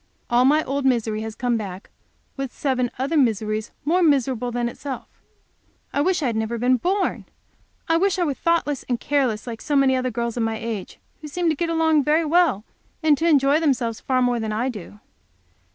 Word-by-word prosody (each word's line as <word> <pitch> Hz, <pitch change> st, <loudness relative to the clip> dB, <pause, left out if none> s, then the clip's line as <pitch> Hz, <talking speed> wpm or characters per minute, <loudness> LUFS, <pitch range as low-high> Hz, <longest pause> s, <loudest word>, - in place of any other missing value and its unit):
All 245 Hz, +1 st, +4 dB
my 300 Hz, +3 st, +4 dB
old 280 Hz, +1 st, -2 dB
misery 230 Hz, -4 st, +1 dB
has 220 Hz, -1 st, -6 dB
come 245 Hz, -1 st, 0 dB
back 195 Hz, -3 st, -7 dB, 0.4 s
with 270 Hz, -2 st, -4 dB
seven 255 Hz, -3 st, -1 dB
other 275 Hz, +6 st, -1 dB
miseries 220 Hz, -5 st, +1 dB, 0.2 s
more 350 Hz, +5 st, +2 dB
miserable 260 Hz, -6 st, +2 dB
than 240 Hz, 0 st, -1 dB
itself. 265 Hz, +2 st, -6 dB, 0.9 s
I 285 Hz, -, +1 dB
wish 355 Hz, 0 st, +1 dB
I -, -, +1 dB
had 235 Hz, -3 st, 0 dB
never 220 Hz, +1 st, -2 dB
been 250 Hz, +2 st, +3 dB
born! 375 Hz, -, -1 dB, 0.6 s
I 330 Hz, -1 st, +3 dB
wish 390 Hz, +2 st, +1 dB
I 360 Hz, -, +1 dB
were 295 Hz, -4 st, 0 dB
thoughtless 315 Hz, -3 st, 0 dB
and 245 Hz, -2 st, 0 dB
careless, 260 Hz, -7 st, 0 dB
like 230 Hz, -2 st, -6 dB
so 290 Hz, -, -2 dB
many 270 Hz, -1 st, +4 dB
other 255 Hz, 0 st, 0 dB
girls 235 Hz, 0 st, -3 dB
of -, -, 0 dB
my 225 Hz, -1 st, -1 dB
age, 220 Hz, -4 st, -5 dB, 0.2 s
who 305 Hz, -, -7 dB
seem 340 Hz, +3 st, -1 dB
to 315 Hz, -, +1 dB
get 335 Hz, +3 st, -2 dB
along 320 Hz, -2 st, +3 dB
very 310 Hz, +4 st, +2 dB
well, 310 Hz, -, +3 dB, 0.4 s
and 310 Hz, -2 st, +5 dB
to 330 Hz, -, +1 dB
enjoy 285 Hz, 0 st, +4 dB
themselves 250 Hz, -8 st, 0 dB
far 255 Hz, -1 st, +1 dB
more 245 Hz, -1 st, +1 dB
than 220 Hz, -1 st, -3 dB
I 230 Hz, +5 st, -1 dB
do. 210 Hz, -3 st, -9 dB
260 Hz, 200 wpm, -23 LUFS, 230-305 Hz, 0.9 s, and